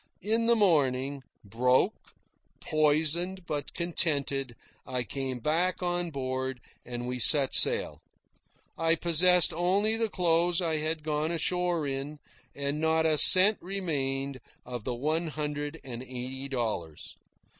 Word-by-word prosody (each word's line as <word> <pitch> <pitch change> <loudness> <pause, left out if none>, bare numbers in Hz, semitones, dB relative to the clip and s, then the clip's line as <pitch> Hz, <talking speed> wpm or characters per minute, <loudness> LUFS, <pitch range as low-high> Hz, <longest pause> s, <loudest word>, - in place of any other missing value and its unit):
In 225 +3 0
the 235 - +4
morning, 140 - 0 0.2
broke, 125 +5 +1 0.7
poisoned, 160 +5 0
but 150 -3 -5
contented, 140 -7 -2 0.3
I 125 -1 -4
came 130 +3 -5
back 170 +9 -1
on 175 -1 -2
board, 130 -2 -4 0.2
and 120 0 -6
we 125 0 -4
set 140 +1 +4
sail. - - +3 0.8
I 165 0 +2
possessed 175 +1 +4
only 195 +6 +2
the 225 -1 -1
clothes 175 -1 +1
I 165 -3 -1
had 155 0 -3
gone 155 0 -2
ashore 175 -1 -1
in, 140 +2 -5 0.4
and 140 +1 -3
not 160 0 +1
a 155 -2 +2
cent 195 +3 +8
remained 140 -8 -3 0.3
of 120 -3 -8
the 125 - -3
one 155 +6 -2
hundred 150 0 -5
and 125 -3 -8
eighty 130 +1 -7
dollars. 110 - -5
150 Hz, 130 wpm, -27 LUFS, 130-175 Hz, 0.8 s, cent